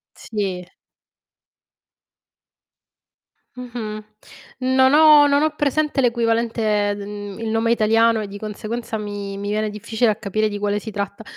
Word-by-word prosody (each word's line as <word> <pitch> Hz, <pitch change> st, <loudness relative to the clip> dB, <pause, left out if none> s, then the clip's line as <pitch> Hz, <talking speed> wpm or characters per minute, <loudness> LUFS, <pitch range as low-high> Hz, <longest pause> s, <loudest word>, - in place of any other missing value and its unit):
Sì. 190 Hz, -5 st, -4 dB, 2.9 s
Mh-mh. 230 Hz, -4 st, -6 dB, 0.6 s
Non 260 Hz, +1 st, +3 dB
ho 300 Hz, -1 st, +7 dB
non 285 Hz, +1 st, +3 dB
ho 310 Hz, -, +3 dB
presente 295 Hz, 0 st, 0 dB
l'equivalente 230 Hz, -3 st, +1 dB
d 200 Hz, -, -7 dB
mhmm, 205 Hz, 0 st, -8 dB
il 225 Hz, -1 st, -3 dB
nome 225 Hz, +1 st, +1 dB
italiano 225 Hz, 0 st, +3 dB
e 210 Hz, -, -5 dB
di 200 Hz, +1 st, -8 dB
conseguenza 220 Hz, +2 st, -5 dB
mi 205 Hz, -1 st, -6 dB
mi 205 Hz, 0 st, -4 dB
viene 215 Hz, +1 st, -1 dB
difficile 220 Hz, +2 st, 0 dB
a -, -, -2 dB
capire 215 Hz, +1 st, -1 dB
di 205 Hz, 0 st, -5 dB
quale 205 Hz, 0 st, 0 dB
si 220 Hz, +1 st, -8 dB
tratta. 200 Hz, +1 st, -5 dB
220 Hz, 135 wpm, -21 LUFS, 205-235 Hz, 2.9 s, ho